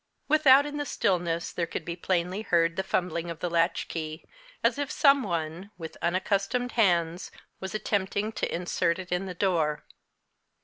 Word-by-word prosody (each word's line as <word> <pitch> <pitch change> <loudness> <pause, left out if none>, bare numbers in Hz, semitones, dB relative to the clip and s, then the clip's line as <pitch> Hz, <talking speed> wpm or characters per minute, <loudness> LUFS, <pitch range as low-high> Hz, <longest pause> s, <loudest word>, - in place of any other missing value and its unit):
Without 285 -2 +6
in 295 0 -5
the 290 - -2
stillness, 170 -2 0
there 170 -1 -1
could - - -5
be 170 - -4
plainly 180 +2 -1
heard 170 -5 +2
the 190 - 0
fumbling 175 -3 -1
of 170 - -5
the 175 +1 -3
latchkey, 165 -2 -1 0.4
as - - +2
if 285 -2 -2
some 280 -2 +5
one, 170 -1 -3
with 160 -2 -7
unaccustomed 200 +7 0
hands, 175 -5 +1 0.3
was 190 +2 -5
attempting 205 0 -1
to - - -2
insert 170 -1 0
it 185 -1 -8
in 180 +2 -1
the 180 - -6
door. 165 -6 +1
180 Hz, 165 wpm, -28 LUFS, 170-205 Hz, 0.4 s, Without